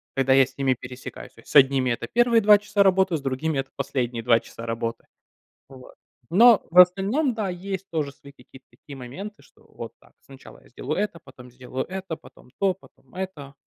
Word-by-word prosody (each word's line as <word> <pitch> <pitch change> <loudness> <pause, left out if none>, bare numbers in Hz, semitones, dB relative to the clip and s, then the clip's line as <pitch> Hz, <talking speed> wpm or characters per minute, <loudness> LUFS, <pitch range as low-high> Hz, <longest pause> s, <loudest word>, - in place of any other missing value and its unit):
когда 135 0 +2
я 135 -1 +6
с 135 0 -18
ними 135 -1 +2
пересекаюсь. 125 +1 -10
То - - -17
есть - - -15
с - - -11
одними 135 -2 +5
это 120 - -3
первые 240 -1 +3
2 210 0 +7
часа 205 0 -1
работы, 190 -3 +3
с - - -9
другими 135 +2 -2
это 135 - -4
последние 125 -4 -3
2 115 0 +4
часа 115 - -11
работы. 115 0 -4 0.6
Вот. 130 -1 -14 0.4
Но 230 +3 +6
в 180 - +6
остальном, 200 - +4
да, 210 -4 -2
есть 190 +1 -5
тоже 150 -4 -2
свои 140 +1 -16
какие-то 130 0 -18
такие 140 - -13
моменты, 190 +12 -9
что - - -25
вот - - -9
так, - - -24
сначала - - -15
я - - -21
сделаю - - -5
это, 205 -5 -3
потом 125 -1 -15
сделаю 130 +1 -6
это, 185 -3 -6
потом 125 - -18
то, 195 -2 +2
потом 190 - -23
это. 170 -7 -7
145 Hz, 200 wpm, -24 LUFS, 130-195 Hz, 0.6 s, 2